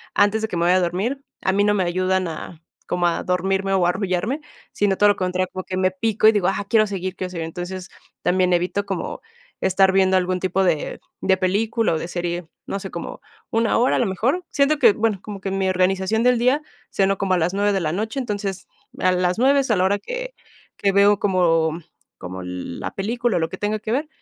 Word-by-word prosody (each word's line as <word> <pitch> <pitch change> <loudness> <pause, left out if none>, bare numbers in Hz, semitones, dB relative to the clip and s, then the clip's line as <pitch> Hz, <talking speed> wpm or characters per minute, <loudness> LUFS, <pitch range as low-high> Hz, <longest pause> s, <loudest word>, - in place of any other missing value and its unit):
antes 205 +2 +3
de 220 - -1
que 180 - -4
me 170 - +1
vaya 180 +2 +4
a - - +2
dormir, 195 +11 -1 0.2
a 190 - +2
mí 200 +1 +2
no 205 0 +3
me 190 - +1
ayudan 185 +1 0
a 165 0 -8 0.2
como 175 0 0
a 170 - +1
dormirme 190 +2 0
o 185 -2 +3
a - - +3
arrullarme, 190 - -1 0.3
sino 200 -2 +1
todo 205 - +5
lo 205 - +3
contrario, 185 0 -1
por 185 0 -5
que, 185 - -4
me 185 0 +2
pico 215 +3 +2
y - - +9
digo: 205 -4 +1
"Ah, 195 +1 -1
quiero 215 0 +4
seguir, 190 -2 -4
quiero 185 0 -4
seguir". 170 -3 -4
Entonces, 180 +3 -6 0.3
también 185 0 +2
evito 180 +3 0
como 190 -4 -4 0.4
estar 190 0 +3
viendo 190 0 +3
algún 185 0 0
tipo 185 +1 0
de 160 -5 0 0.2
de 190 - +3
película 210 +3 +1
o - - 0
de - - -5
serie, 175 -1 -3 0.2
no 195 - -3
sé, 190 0 -7
como 170 - -7 0.3
1, 225 0 +1
hora, 245 +2 +3
a - - +1
lo 245 - +2
mejor. 250 - 0
Siento 290 +1 +2
que, 210 - +6
bueno, 215 -2 0
como 200 -2 -8
que 195 - -3
mi 195 0 0
organización 190 +4 +1
del 250 0 +4
día, 255 +5 +2 0.3
ceno 195 0 +1
como 190 -1 0
a - - +3
las 175 +2 0
9, 205 +1 +1
de 195 - +1
la 155 -2 -1
noche, 220 - -2
entonces, 205 -6 -4 0.3
a 185 - +3
las 180 0 +1
9, 275 +3 +4
es 260 - -2
a - - +4
la 185 - +2
hora 200 +2 +2
que - - -6 0.4
que 200 - +2
veo 200 +1 +5
como 165 -4 +2 0.4
como 90 +1 -7
la 90 -1 -5
película, 235 +3 -1
o - - +1
lo 160 0 -1
que - - -7
tenga 210 +1 -1
que 215 +1 -5
ver. 285 +6 0
190 Hz, 235 wpm, -22 LUFS, 180-210 Hz, 0.4 s, y